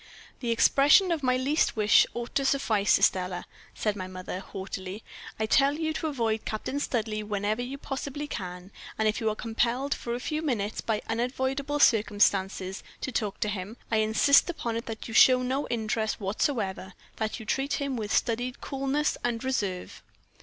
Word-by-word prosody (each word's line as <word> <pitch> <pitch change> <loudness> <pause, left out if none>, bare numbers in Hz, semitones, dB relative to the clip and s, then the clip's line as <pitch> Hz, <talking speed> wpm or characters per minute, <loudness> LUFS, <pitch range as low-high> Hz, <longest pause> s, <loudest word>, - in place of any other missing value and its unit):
"'The 240 - -3
expression 285 - +5
of 325 -3 0
my 255 -1 +2
least 280 +5 +1
wish 210 -1 +5
ought 240 0 -5
to 275 - +1
suffice, 225 -7 +3
Estelle,' 180 -1 +1 0.3
said 210 -2 -1
my 185 -2 -5
mother, 185 0 -6
haughtily. 190 +1 -7 0.4
'I 220 - +1
tell 275 +5 +4
you 315 0 -1
to 315 - -2
avoid 230 -7 -1
Captain 220 +6 -3
Studleigh 220 -6 -1
whenever 210 +2 -1
you 255 +3 -5
possibly 280 +1 -5
can; 180 -6 -6 0.3
and 220 - +2
if 215 +3 0
you 220 - +2
are 215 - -2
compelled 240 +5 0
for 235 0 -4
a - - -4
few 305 +4 -2
minutes, 225 -9 -2
by 220 -2 -1
unavoidable 260 +5 -1
circumstances, 200 -5 +2 0.2
to 260 - -3
talk 210 -4 -2
to - - +1
him, 205 +2 -4
I 220 - +3
insist 220 +9 +4
upon 235 -9 -3
it 230 - -4
that 225 -1 -6
you 225 - -7
show 255 +2 +7
no 265 +3 -1
interest 220 -1 -1
whatever 195 -2 -2 0.2
that 220 +1 -2
you 220 - -9
treat 270 +6 -1
him 280 -2 -1
with 215 -3 -4
studied 245 +2 0
coolness 275 +2 -1
and 235 -1 -1
reserve.' 205 -9 -2
230 Hz, 175 wpm, -28 LUFS, 210-270 Hz, 0.4 s, show